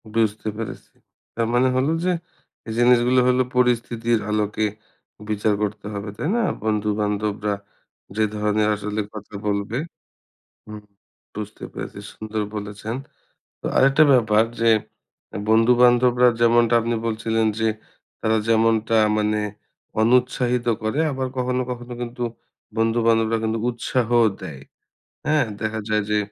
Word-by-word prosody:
বুঝতে 110 -1 0
পেরেছি। 115 -1 -7 0.4
তার 115 -1 0
মানে 125 +2 +4
হলো 130 +4 +2
যে, 185 - +2 0.6
এই 110 - -4
জিনিসগুলো 125 +1 +4
হলো 125 0 +3
পরিস্থিতির 120 -2 +1
আলোকে 105 0 0 0.6
বিচার 105 0 +1
করতে 105 0 -4
হবে, 100 +1 -5
তাই 150 - -2
না? - - +2 0.2
বন্ধু-বান্ধবরা 105 -1 -1 0.6
যে, 110 - +2
ধরনের 105 0 +1
আসলে 105 +1 -3
কথা 105 -1 -10
বলবে 100 +3 -1 0.9
হুম, 105 0 -9 0.5
বুঝতে 105 0 -7
পেরেছি, - - -7 0.2
সুন্দর 110 0 -4
বলেছেন। 105 +2 -5 0.7
তো - - -6
আরেকটা 135 +3 +5
ব্যাপার 110 -3 +4 0.2
যে, 115 0 +4 0.8
বন্ধু-বান্ধবরা 125 +2 +5
যেমনটা 120 0 +4
আপনি 115 +1 -1
বলছিলেন 110 0 0
যে, 110 0 +2 0.5
তারা 110 0 +2
যেমনটা 115 0 +3 0.2
মানে 105 0 +1 0.6
অনুৎসাহিত 125 +1 +2 0.2
করে, 110 +8 0
আবার 130 -1 -2
কখনো, 125 0 0
কখনো 120 0 -6
কিন্তু 120 +1 -5 0.5
বন্ধু-বান্ধবরা 115 0 +2
কিন্তু 110 0 0
উৎসাহ 120 0 -1 0.3
দেয়। - - -7 0.7
হ্যাঁ? 150 0 +3 0.2
দেখা 110 0 -2
যায় 110 0 +2
যে, 105 - +3
115 Hz, 120 wpm, -22 LUFS, 105-120 Hz, 0.9 s, আরেকটা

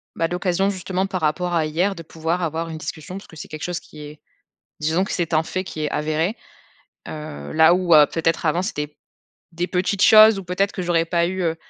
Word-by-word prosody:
bah 165 - 0
l'occasion, 180 +2 0
justement, 185 0 -2
par 190 -2 -4
rapport 175 +3 0
à 160 -2 +1
hier, 175 +6 0
de 170 - -9
pouvoir 165 +2 -3
avoir 165 0 -2
une 160 - -6
discussion 155 +4 -7
parce 195 - -11
que - - -15
c'est - - -8
quelque 155 0 -7
chose 175 -1 -3
qui 150 - -14
est 150 0 -10 0.6
disons 160 +5 +1
que - - -5
c'est 170 -2 -2
un 155 0 +3
fait 185 +3 -3
qui 160 -4 -7
est - - -1
avéré. 155 +6 -1 0.7
Heu, 75 - -7
là, 160 +1 +6
où 180 -2 +3
heu, 150 -1 +8
peut-être 165 0 0
avant 170 +3 +1
c'était 150 -6 -4 0.6
des 175 +2 -2
petites 185 +2 -1
choses, 215 -1 +8
ou 195 - -7
peut-être 180 +3 0
que - - -5
j'aurais 170 -2 +1
pas 170 0 +1
eu, 185 +1 -3
heu 165 -1 0
170 Hz, 225 wpm, -22 LUFS, 155-185 Hz, 0.7 s, heu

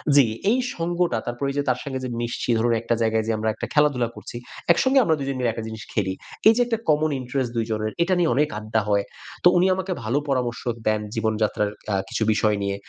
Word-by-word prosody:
জি, 140 -3 +7 0.3
এই 250 - +3 0.2
সঙ্গটা 175 -4 0
তারপর 120 +3 -3
এইযে 145 +1 -1
তার 125 0 +1
সঙ্গে 135 -2 -4
যে - - -3
মিশছি 120 +1 -3
ধরুন 120 +1 +2
একটা 120 0 0
জায়গায় 110 -1 +2
যেয়ে 110 -1 0
আমরা 110 0 0
একটা - - -5
খেলাধুলা 145 -5 +3
করছি। - - -9 0.4
একসঙ্গে 260 +9 +3
আমরা 160 -7 +3
২ 135 - -3
জন 135 - -2
মিলে 120 -2 +1
একটা 115 0 -5
জিনিস 110 -1 -7
খেলি। 95 -3 0 0.3
এই 220 - +8
যে - - +4
একটা 230 -2 0
common 155 +1 +3
interest 130 0 -2
২ 115 - +1
জনের 110 0 -1
এটা 185 +2 +1
নিয়ে 170 -5 +3
অনেক 150 +2 +2
আড্ডা 110 +1 0
হয়। 100 -1 +3 0.4
তো - - +8
উনি 175 - +4
আমাকে 190 0 -4
ভালো 115 +5 0
পরামর্শ 125 -3 -1 0.3
দেন। 110 0 +2
জীবনযাত্রার 110 -2 0 0.2
আ - - +2
কিছু - - -1
বিষয় 105 0 +2
নিয়ে। 100 0 -1
120 Hz, 225 wpm, -23 LUFS, 110-150 Hz, 0.4 s, এই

